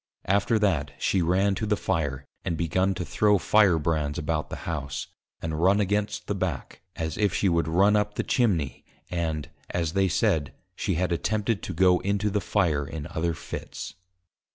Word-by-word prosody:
_ - - -68 0.2
After 100 +3 +2
that, 85 -10 +1
she 95 - +1
ran 95 +4 +2
to 110 +2 -2
the 105 0 +1
Fire, 70 -7 -1 0.2
and 85 - -2
begun 95 +4 +1
to 90 - -3
throw 105 +4 +3
Fire 95 -1 +4
brands 75 -2 -1
about 75 +1 -2
the - - -7
House, 70 -4 -3 0.4
and 80 -1 -2
run 95 +3 +4
against 105 +1 0
the - - -1
Back, 90 -7 -4
as 80 -1 -3
if 105 -2 +2
she 100 - +2
would 85 -3 +2
run 95 +6 +4
up 105 0 0
Chimney, 95 - +1 0.3
and, 80 -4 -2 0.2
as 85 -2 -1
they 95 -1 +3
said, 75 -4 +1 0.2
she 95 -2 -1
had 90 +1 0
attempted 105 +4 0
to 95 - -5
go 90 +1 +5
into 100 +1 0
the 105 0 0
Fire 80 -9 +1
in 75 0 -6
other 85 0 -1
Fits. - - -7
90 Hz, 180 wpm, -26 LUFS, 80-100 Hz, 0.4 s, go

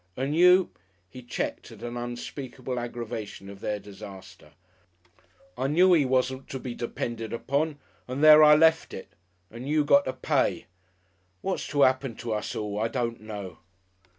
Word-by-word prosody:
And 135 +4 -1
you 180 +2 +5 0.2
" 90 -1 -41
He 130 - -10
checked 120 - -4
at - - -12
an 120 0 -5
unspeakable 120 +1 -5
aggravation 110 -4 -6
of 100 - -12
their 105 +1 -2
disaster. 100 -1 -12 1.0
"I 130 +3 -1
knew 180 +5 +5
'e 150 -4 +3
wasn't 130 +1 0
to 135 - -5
be 125 -1 -6
depended 115 -1 -5
upon 145 +5 -1 0.3
and 130 +4 -3
there 155 0 +9
I 150 0 +8
left 160 +1 +3
it! 95 - -10 0.4
And 120 +4 -7
you 150 -1 +2
got 140 -1 +5
to 130 - -2
pay.... - - 0 0.8
What's 190 - -3
to 145 -1 +2
'appen 130 -2 +2
to 115 -1 -4
us 105 - -3
all, 105 -1 -3
I 110 - +1
don't 115 -1 -3
know." 100 -5 -8
125 Hz, 165 wpm, -27 LUFS, 110-145 Hz, 1.0 s, there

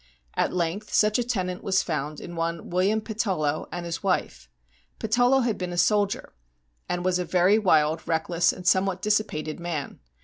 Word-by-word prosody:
At - - 0
length 175 +3 -2
such 210 +2 +3
a - - +1
tenant 185 -7 -3
was 190 -1 +2
found 150 -2 -3
in 175 - -8
one 165 0 -3
William 195 +5 +2
Patullo 190 -10 -1
and 175 -1 -5
his 170 -1 -4
wife. 190 -2 -2 0.5
Patullo 245 +4 +3
had 235 -4 -1
been 180 -1 -3
a 175 - -5
soldier, 205 - +1 0.6
and 180 0 -2
was 185 -1 +2
a - - 0
very 180 +4 +3
wild, 160 -5 +2
reck 160 -1 0
less, 175 0 +3
and 180 -1 -8
somewhat 185 0 +2
dissipated 205 -8 -1
man. 170 -5 -4
180 Hz, 175 wpm, -26 LUFS, 165-210 Hz, 0.6 s, such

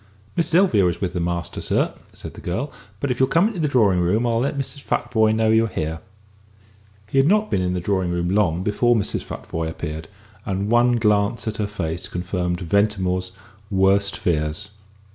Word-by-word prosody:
"Miss 170 - +1
Sylvia 165 - +4
is 85 - -2
with 95 -2 -2
the 90 - -2
master, 85 -2 -2
sir," - - 0 0.2
said - - -8
the - - -11
girl; - - -3 0.3
"but 140 - -1
if 125 - -2
you'll 130 0 +3
come 175 +9 +4
into 205 -6 -6
the 155 - +1
drawing 105 -10 +3
room 95 +7 +1
I'll 115 -1 +1
let 140 +3 -1
Mrs. 140 +1 -4
Futvoye 110 -2 +1
know 110 0 +2
you 110 +1 +4
are - - -2
here." 80 -5 -3 1.1
He 135 +6 +1
had 135 - +4
not 210 +4 +2
been 95 - +2
in 90 0 0
the - - -1
drawing 95 -1 0
room 85 0 -1
long 90 -3 +1
before 120 +4 +2
Mrs. 105 - 0
Futvoye 80 0 -5
appeared, 80 -1 -6 0.4
and 100 +2 -2
one 120 +1 +4
glance 105 0 +1
at 110 0 -2
her 105 - -1
face 85 -5 -3
confirmed 90 0 -2
Ventimore's 95 0 0 0.4
worst 100 0 +2
fears. 80 +3 -1
100 Hz, 195 wpm, -22 LUFS, 90-120 Hz, 1.1 s, Sylvia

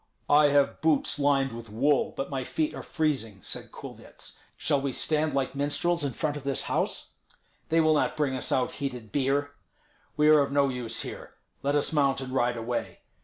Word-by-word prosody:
"I 145 0 +7
have 145 -1 +2
boots 150 -1 +2
lined 140 -2 +2
with 115 -1 -8
wool, 135 +7 +2
but 135 - -3
my 135 -2 -2
feet 155 +4 -1
are - - -6
freezing," 135 - -1
said - - -5
Kulvyets. - - -9 0.2
"Shall 145 -3 +1
we 135 -1 -2
stand 155 0 0
like 135 -1 0
minstrels 145 +5 0
in 140 -3 -1
front 150 +4 -1
of 145 - -6
this 140 -1 0
house? - - -2 0.6
They 165 - +3
will 155 0 +4
not 150 - +1
bring 145 -3 +1
us 130 - -2
out 130 -1 +1
heated 125 -6 -5
beer. 145 +2 +1 0.7
We 150 0 +4
are 155 -1 +7
of 140 - -1
no 140 -1 +3
use 125 -3 -3
here; - - -8 0.3
let 140 +1 0
us 145 +2 +1
mount 140 -3 +2
and 130 -1 -6
ride 120 -2 +1
away. 120 +1 -4
140 Hz, 195 wpm, -28 LUFS, 130-150 Hz, 0.7 s, I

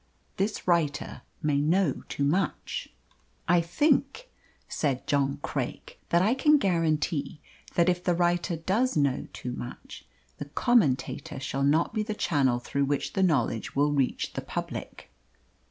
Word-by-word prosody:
This 200 +1 -2
writer 165 -5 0 0.2
may 145 -2 +2
know 165 0 +1
too 140 - -2
much." 165 +5 -1 0.6
"I 175 0 +4
think," 280 - +1 0.4
said 135 -4 -1
John 140 -1 +1
Craik, - - -4
"that 170 +1 +4
I 215 +5 +3
can 300 +3 +4
guarantee 160 - 0 0.4
that 170 0 +4
if 180 0 +1
the 175 - +2
writer 175 +1 +1
does 195 +8 0
know 140 -3 +1
too 125 - -6
much, 120 0 -8 0.3
the 145 - -4
Commentator 145 - +1
shall 135 0 -3
not 150 +7 +2
be 215 - 0
the 215 0 -3
channel 135 -10 +2
through 140 +3 -1
which 140 0 -1
the 195 - 0
knowledge 135 - +1
will 145 +1 +3
reach 135 -3 0
the - - -3
public." - - -6
165 Hz, 145 wpm, -27 LUFS, 140-190 Hz, 0.6 s, I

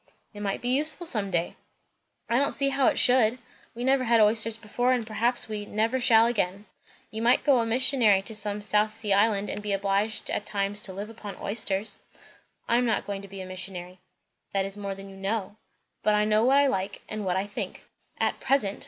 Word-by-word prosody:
"It 205 - -10
might 200 +3 -3
be 245 - -1
useful 305 +6 +1
some 210 -10 +3
day." 175 -2 -2 0.7
"I 235 +2 +2
don't 280 - +1
see 275 -1 +2
how 270 -1 +2
it - - +2
should. 245 -2 +4 0.4
We 240 - -5
never 265 0 +2
had 230 -1 +4
oysters 220 +1 +2
before, 245 +3 -1
and 245 -3 -1
perhaps 235 +3 -1
we 210 -1 -4
never 225 +5 0
shall 225 -1 +5
again." 205 -4 -1 0.5
"You 220 - -5
might 240 +2 +3
go 275 -4 +4
a 230 - 0
missionary 230 -5 +3
to 220 - -7
some 210 -1 0
South 210 +1 +2
Sea 210 -2 -1
island, 205 0 +2
and - - -5
be 205 -1 -2
obliged 200 +2 -1
at - - -2
times 205 0 -2
to 190 - -6
live 205 +4 -6
upon 210 -3 -9
oysters." 205 -1 -1 0.7
"I 235 - +3
am 245 - +2
not 225 - 0
going 200 -1 -4
to 200 - -11
be 195 0 -9
a - - -6
missionary." 185 -1 -7 0.5
"That 195 -1 +1
is 195 0 -2
more 200 -1 -5
than 195 0 -10
you 195 0 -12
know." 200 +1 -3 0.4
"But 210 - +2
I 210 0 +2
know 215 +1 +3
what 270 +2 +4
I 285 - +5
like, 195 -6 -2
and 215 -1 -5
what 185 -1 0
I 190 - -1
think." 205 - -6 0.3
"At - - 0
present. 210 -8 0
215 Hz, 215 wpm, -26 LUFS, 200-235 Hz, 0.7 s, shall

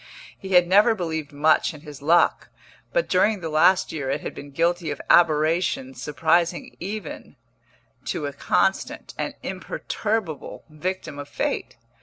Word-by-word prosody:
He 190 -1 -6
had 180 -1 +6
never 205 +5 +5
believed 160 -6 -4
much 155 +2 +2
in 145 - -12
his 145 -3 -11
luck, 165 +4 +3 0.4
but - - +1
during 215 -1 +2
the 165 -2 -4
last 180 +5 +4
year 140 -4 -4
it 140 +2 -1
had - - -5
been 145 - -9
guilty 170 +3 0
of 145 - -4
aberrations 155 -5 +2
surprising 170 +5 0
even 195 -6 -6 0.7
to 145 - -2
a 145 - -4
constant, 190 +6 0
an - - -3
imperturbable, 210 -8 -3
victim 155 -2 -4
of 145 - -7
fate. - - -3
160 Hz, 145 wpm, -24 LUFS, 145-185 Hz, 0.7 s, had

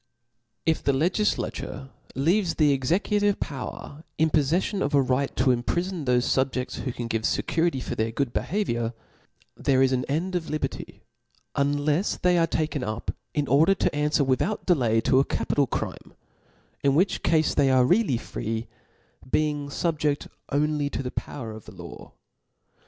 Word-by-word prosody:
If 160 0 +1
the 140 - +2
legidature 160 -3 -1 0.3
leaves 170 +6 +2
the 150 -3 +4
executive 200 +9 +1
power 140 +1 -6
in 160 0 +2
poflefllon 170 +7 +1
of 145 - +1
a 140 - +6
right 130 +2 0
to 130 -2 +3
imprifon 175 +6 -2
thoie 125 -1 +3
fubjefb^ 130 -1 0
who 130 - -3
can 120 0 -5
give 115 -1 -1
fecurity 160 +2 0
for - - -4
their 110 +1 0
good 125 +1 -2
behaviouri 120 - -1 0.6
there 135 -1 +2
is 135 - +3
an 125 -1 0
end 165 +7 -2
of 175 -3 -2
liberty; 155 - -4 0.5
unlefs 145 +5 +1
they 180 -1 +3
are 165 - +3
taken 155 -4 -1
up, 110 -1 -3 0.2
in 145 -2 0
order 160 +8 +5
to - - +1
anfwer 150 0 +1
without 135 +11 0
delay 120 - +3
to 130 - +3
a - - +5
capital 140 0 0
crime - - -5 0.3
% - - -36
in 140 -1 +3
which 185 +6 +2
cafe 160 -2 +2
they 140 -1 +4
are 130 -1 +5
really 180 - +3
free, 115 0 -4 0.6
being 150 -1 0
fubjed 150 -1 -1 0.2
on 150 +1 +1
ly 145 - 0
to 140 - -3
the 125 - -4
power 115 -6 -5
of 110 -1 -10
the - - -12
law. - - -10
145 Hz, 165 wpm, -26 LUFS, 130-165 Hz, 0.6 s, a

